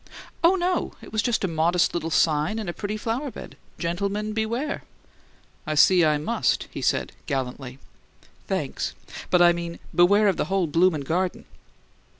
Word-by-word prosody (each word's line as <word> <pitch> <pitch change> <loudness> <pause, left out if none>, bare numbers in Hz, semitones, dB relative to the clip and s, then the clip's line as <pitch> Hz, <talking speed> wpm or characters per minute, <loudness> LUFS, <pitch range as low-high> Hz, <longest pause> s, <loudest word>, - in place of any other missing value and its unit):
"Oh, 345 +3 +6
no. 365 0 -1
It - - -12
was 215 - +2
just 235 -2 0
a - - +2
modest 170 +1 +1
little 165 -1 -2
sign 155 +4 +2
in 215 -4 -4
a 175 - -3
pretty 205 +3 -4
flower 235 +7 -2
bed: - - -10 0.2
'Gentlemen, 200 +5 -2
beware!'" 230 +7 -2 0.9
"I 155 - -1
see 180 +3 +6
I 155 -1 +3
must," 170 +11 0
he - - -6
said, - - 0 0.2
gallantly. 130 -2 -4 0.7
"Thanks! - - -3 0.3
But 175 -1 +5
I 175 0 +6
mean, 170 0 -5 0.2
beware 200 +4 +5
of 195 - +2
the - - 0
whole 190 -1 +1
bloomin' 165 0 +2
garden!" 175 +6 -2
180 Hz, 160 wpm, -24 LUFS, 165-215 Hz, 0.9 s, Oh